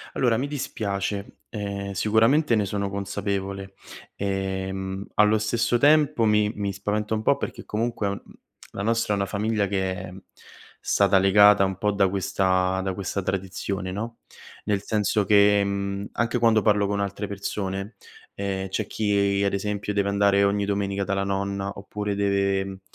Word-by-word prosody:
Allora, 120 -3 +2
mi 130 +5 -1
dispiace, 100 -7 -4
ehm, 100 -2 -4
sicuramente 115 - +3
ne 105 -2 +1
sono 100 0 -2
consapevole, 100 0 -3 0.4
ehm, 95 0 -3
allo 105 +1 +4
stesso 115 +3 +1
tempo 145 -4 +4
mi 105 0 +3
mi 100 -1 -2
spaventa 105 +2 -2
un 110 - -2
po' - - +3
perché - - -5
comunque, 110 -1 -2
mhmm, 100 - -5 0.5
la 100 - -4
nostra 115 -1 +1
è - - 0
una 100 - 0
famiglia 105 0 0
che 95 -1 -1
è 90 0 -7 0.7
stata 100 -1 +3
legata 100 +1 +6
un 95 -1 -2
po' 105 0 +1
da 100 -1 +3
questa 95 -1 +1
da 95 0 -2
questa 100 +1 -3
tradizione, 95 0 -3
no, 115 +4 -5 0.5
nel 105 -1 0
senso 105 -1 +1
che, 100 0 +5
mhmm, 100 0 -3
anche 115 +2 0
quando 115 -2 +4
parlo 105 -1 +2
con 100 0 -1
altre 100 +1 -3
persone, 100 +1 -4 0.4
ehm, 95 -1 -3
c'è 105 +2 -2
chi 100 -2 +1
ad 100 - +1
esempio 105 +1 -2
deve 100 0 +1
andare 100 0 +3
ogni 100 0 +1
domenica 100 -1 -1
dalla 100 0 -1
nonna 100 0 -2
oppure 105 +1 -4
deve, 100 -1 0
100 Hz, 155 wpm, -25 LUFS, 95-105 Hz, 0.7 s, legata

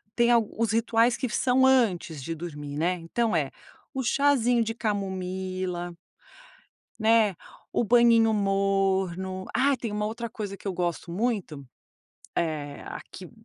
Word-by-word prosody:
tem 235 0 +4
al 230 -3 +4
os 230 -1 +1
rituais 230 +1 +2
que 255 - -2
são 260 +3 +3
antes 190 - +2
de 165 +2 -4
dormir, 150 -3 -7
né? 170 +4 +1
Então 180 +5 -1
é, 145 -4 0 0.4
o 265 -1 -2
chazinho 245 -2 +3
de 225 0 -3
camomila, 185 -4 -3 1.1
né, 220 -3 +4 0.4
o - - +2
banhinho 230 -1 +5
morno. 195 -2 0
Ah, 275 +2 +3
tem 230 -2 -4
uma 210 0 -1
outra 230 +2 -4
coisa 205 -2 -5
que 195 - -8
eu 190 - -1
gosto 175 -1 -3
muito, 185 - -2 0.7
é 150 -4 -2
aqui, - - -9
200 Hz, 140 wpm, -27 LUFS, 180-230 Hz, 1.1 s, banhinho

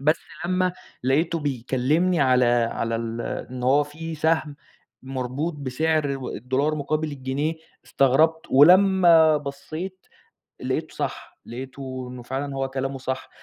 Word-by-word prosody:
بس 155 +4 +3 0.3
لمّا 185 +1 +1 0.3
لقيته 160 +5 +1
بيكلّمني 145 +5 0
على 130 -2 +4 0.3
على 115 0 -2
ال 115 0 -4 0.3
إن 125 -1 -6
هو 140 +4 +4
في 160 +3 -7
سهم 155 -2 0 0.5
مربوط 130 +5 -3
بسعر 145 +1 0
و 130 - -6
الدولار 130 +6 -1
مقابل 155 +1 -2
الجنيه، 140 +4 -2 0.3
استغربت. 160 +5 +2
ولمّا 170 0 +6
بصّيت، 155 +6 -7 0.5
لقيته - - -3
صح. - - -5
لقيته 130 +1 -7
إنه 125 -1 -8
فعلًا 135 +2 -4
هو 135 0 -1
كلامه 135 0 -3
صح. 130 0 -4
140 Hz, 125 wpm, -24 LUFS, 130-160 Hz, 0.5 s, ولمّا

